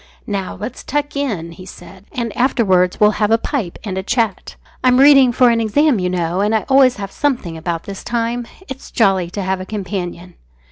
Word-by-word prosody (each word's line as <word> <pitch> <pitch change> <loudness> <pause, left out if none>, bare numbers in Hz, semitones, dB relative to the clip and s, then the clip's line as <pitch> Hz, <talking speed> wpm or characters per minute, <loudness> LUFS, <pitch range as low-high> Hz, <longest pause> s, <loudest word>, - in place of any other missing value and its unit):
"Now, 195 -3 -4
let's 215 +5 -6
tuck 290 +1 -2
in," 210 -13 -3
he 170 +2 -12
said, 195 0 -13
"and 235 -5 -4
afterwards 190 -8 +2
we'll 210 0 +5
have 210 - +3
a 225 - +4
pipe 230 - -3
and 190 -3 -3
a - - -2
chat. 225 -1 -2 0.3
I'm 250 -1 +4
reading 275 -2 +7
for 245 0 +4
an 230 0 +1
exam, 260 +3 +2
you 180 0 -1
know, 175 0 -1
and 210 +2 +1
I 220 - +1
always 265 -2 +5
have 200 -1 -6
something 245 - -2
about 165 0 -4
this 195 -1 -8
time. 235 0 -2 0.2
It's 265 0 -9
jolly 195 -6 +2
to 200 +2 -4
have 190 0 -2
a - - -4
companion." 180 -3 -5
210 Hz, 200 wpm, -18 LUFS, 185-250 Hz, 0.3 s, reading